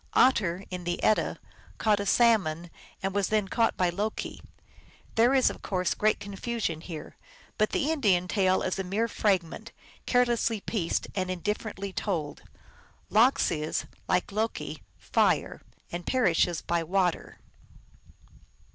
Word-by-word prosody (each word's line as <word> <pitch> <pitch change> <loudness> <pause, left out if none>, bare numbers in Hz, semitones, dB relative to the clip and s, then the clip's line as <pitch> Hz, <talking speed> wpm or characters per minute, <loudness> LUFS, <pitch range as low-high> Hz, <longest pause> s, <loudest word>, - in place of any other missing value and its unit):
Otter, 195 -8 +3
in 180 -1 -5
the 175 0 -3
Edda, 215 - +2 0.4
caught 210 -2 +2
a 200 - -3
salmon, 185 -9 +3 0.3
and 195 0 -1
was 200 -1 +1
then 215 -2 +1
caught 225 +3 +1
by 180 -1 +2
Loki. 210 +5 -4 0.7
There 240 +4 +4
is, 260 - +4
of - - -11
course, 185 -2 -1
great 215 0 +1
confusion 200 -4 -3
here, 160 -3 -8 0.4
but 215 - +3
the 295 - 0
Indian 195 - +2
tale 185 -1 +2
is 185 - -2
a - - 0
mere 205 +5 0
fragment, 190 -7 -1 0.4
carelessly 240 -3 +2
pieced 195 -4 -2
and 185 -2 -2
indifferently 200 +1 -3
told. 160 -9 -3 0.7
Lox 235 +2 +4
is, 155 -1 -2 0.2
like 180 +2 +1
Loki,^re, 220 +3 -1 0.3
and 175 0 -5
perishes 175 -8 +2
by 170 0 0
water. 180 +1 -1
195 Hz, 130 wpm, -28 LUFS, 175-220 Hz, 0.7 s, There